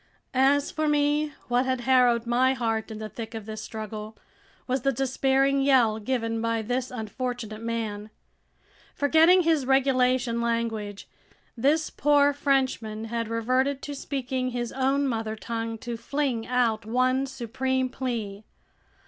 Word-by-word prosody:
As 275 +2 +3
for 310 0 -1
me, 295 0 +2 0.2
what 245 +1 +1
had 255 -1 0
harrowed 245 -2 +3
my 255 +3 +2
heart 225 -2 -1
in 220 - -6
the 215 0 -5
thick 225 +1 -8
of 220 -2 -6
this 215 0 -6
struggle 215 0 -7 0.5
was 260 0 -1
the 275 - +2
despairing 270 +1 +1
yell 250 -6 +4
given 230 -1 -2
by 230 -1 0
this 245 +3 -2
unfortunate 225 -1 -5
man. 220 -2 -3 0.9
Forgetting 320 +5 +5
his 320 -4 +2
regulation 255 -3 +2
language, 225 -3 -2 0.5
this 290 +6 +1
poor 285 0 +3
Frenchman 260 -6 0
had 230 -1 -1
reverted 255 +5 0
to 290 - -5
speaking 260 -2 -3
his 240 -1 -3
own 270 +2 +1
mother 225 -3 -2
tongue 225 0 -4
to 235 +1 -5
fling 260 -2 -2
out 235 -3 +1
one 255 +4 +1
supreme 260 +1 -1
plea! 230 -6 -4
250 Hz, 140 wpm, -26 LUFS, 225-270 Hz, 0.9 s, Forgetting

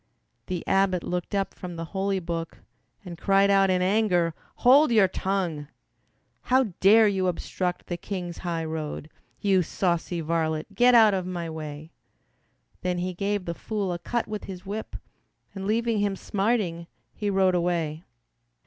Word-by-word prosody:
The 180 -2 -4
abbot 195 -2 +2
looked 180 +3 -3
up 195 -1 -1
from 180 -2 -8
the 165 0 -5
holy 195 0 0
book 165 -1 -5 0.4
And 175 -2 -8
cried 195 0 +4
out 195 -1 +4
in 180 -1 +2
anger, 185 -4 +2 0.3
"Hold 275 +2 +7
your 215 -4 +5
tongue! 180 -7 -2 0.8
"How 255 -6 +3
dare 215 +3 +6
you 190 -2 +1
obstruct 180 0 -2
the 175 - -4
King's 175 -2 -5
highroad, 160 -3 -4 0.3
You 195 -2 +3
saucy 170 0 -1
varlet, 160 +2 -1
get 245 +4 +5
out 220 -3 +7
of 185 -2 -2
my 170 -3 -4
way." 155 0 -7 0.9
Then 180 -1 -1
he 180 +1 -2
gave 200 +1 -2
the 170 - -3
fool 200 0 -3
a 175 - -4
cut 235 +7 -2
with 215 -1 -5
his 185 -1 -8
whip 210 +3 -5 0.6
And 195 -1 -5
leaving 230 0 +1
him 200 -1 0
smarting, 195 -5 -1 0.3
he 210 - -2
rode 190 -1 +3
away. 170 -3 -1
185 Hz, 155 wpm, -26 LUFS, 170-200 Hz, 0.9 s, Hold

